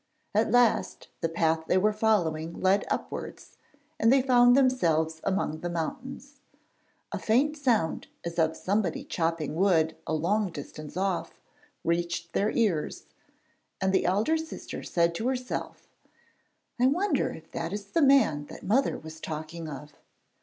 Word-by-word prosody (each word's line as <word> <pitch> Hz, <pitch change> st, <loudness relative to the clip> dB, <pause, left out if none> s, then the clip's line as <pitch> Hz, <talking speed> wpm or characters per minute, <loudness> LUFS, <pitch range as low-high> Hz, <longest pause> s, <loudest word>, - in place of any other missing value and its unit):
At 215 Hz, +2 st, +2 dB
last 245 Hz, -1 st, +2 dB
the 165 Hz, -, -1 dB
path 160 Hz, -1 st, +1 dB
they -, -, +3 dB
were 210 Hz, +3 st, +3 dB
following 170 Hz, -7 st, 0 dB
led 190 Hz, +2 st, +3 dB
upwards, -, -, -5 dB, 0.4 s
and 225 Hz, +2 st, +4 dB
they 265 Hz, -1 st, +5 dB
found 245 Hz, -1 st, +6 dB
themselves 160 Hz, -, +2 dB
among 190 Hz, -5 st, -1 dB
the 175 Hz, -, -4 dB
mountains. 265 Hz, -, -5 dB, 0.7 s
A -, -, -3 dB
faint 275 Hz, +7 st, +2 dB
sound 240 Hz, -, 0 dB, 0.2 s
as 170 Hz, 0 st, -3 dB
of 160 Hz, 0 st, +2 dB
somebody 195 Hz, -3 st, -1 dB
chopping 165 Hz, -3 st, -2 dB
wood 165 Hz, -2 st, +2 dB
a -, -, -1 dB
long 195 Hz, +6 st, +1 dB
distance 155 Hz, +1 st, -8 dB
off 190 Hz, -2 st, -2 dB, 0.4 s
reached 170 Hz, 0 st, -1 dB
their 205 Hz, -, +2 dB
ears, 200 Hz, -11 st, 0 dB, 0.8 s
and 190 Hz, 0 st, +1 dB
the 190 Hz, -, +2 dB
elder 210 Hz, -, +2 dB
sister 320 Hz, 0 st, -7 dB
said 170 Hz, -1 st, +1 dB
to 225 Hz, +8 st, -2 dB
herself, 255 Hz, -1 st, -4 dB, 0.9 s
'I 250 Hz, -, +5 dB
wonder 320 Hz, +1 st, +1 dB
if 160 Hz, 0 st, -13 dB
that 165 Hz, 0 st, -4 dB
is 205 Hz, 0 st, -4 dB
the 330 Hz, -, +2 dB
man 270 Hz, -, +4 dB
that -, -, -11 dB
mother 250 Hz, +8 st, +2 dB
was 160 Hz, 0 st, -10 dB
talking 160 Hz, +1 st, -6 dB
of.' 150 Hz, +1 st, -9 dB
190 Hz, 145 wpm, -28 LUFS, 160-245 Hz, 0.9 s, found